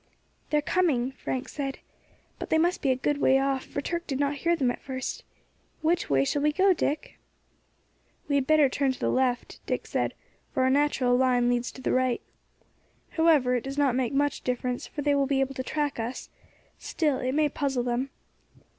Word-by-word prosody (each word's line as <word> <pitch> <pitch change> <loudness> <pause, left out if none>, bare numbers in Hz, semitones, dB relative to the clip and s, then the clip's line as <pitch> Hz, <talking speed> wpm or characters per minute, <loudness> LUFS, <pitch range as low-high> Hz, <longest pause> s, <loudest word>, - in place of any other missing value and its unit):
"They 300 - +2
are - - +2
coming," 285 -10 +1
Frank 260 -1 -4
said; 275 -2 -4 0.6
"but - - -6
they 320 - +3
must 345 +3 +1
be 275 - +1
a 260 - +4
good 285 +3 -1
way 265 - +5
off, 270 -1 0
for 285 - -4
Turk 340 +4 -3
did 270 -2 -2
not 285 0 0
hear 340 +3 +2
them 260 -6 +1
at - - -8
first. 265 - -5 0.6
Which 335 +2 +1
way 135 -1 +3
shall 290 - 0
we 300 +1 +3
go, 380 +4 +4
Dick?" 300 -3 -3 1.1
"We 285 - -1
had 275 -2 +2
better 310 -2 +5
turn 270 +1 0
to - - -12
the - - 0
left," 255 -1 0
Dick - - -2
said, - - -1 0.4
"for 260 - +1
our 260 - +3
natural 270 -3 +2
line 250 -1 +3
leads 245 0 -1
to 260 - -11
the - - 0
right. 255 -1 +1 0.9
However, 310 -6 +3
it 245 -2 0
does 275 +1 -6
not 280 -3 +3
make 255 -2 0
much 285 +1 0
difference, 250 0 -2
for 290 - -5
they 290 0 +3
will 280 -1 +2
be 275 -1 +1
able 270 0 0
to 260 - -4
track 290 0 -2
us; 235 +3 -5 0.5
still, 295 -5 0
it 255 +1 -1
may 305 +1 +3
puzzle 275 -3 -1
them. 245 +2 -1
270 Hz, 205 wpm, -27 LUFS, 255-295 Hz, 1.1 s, way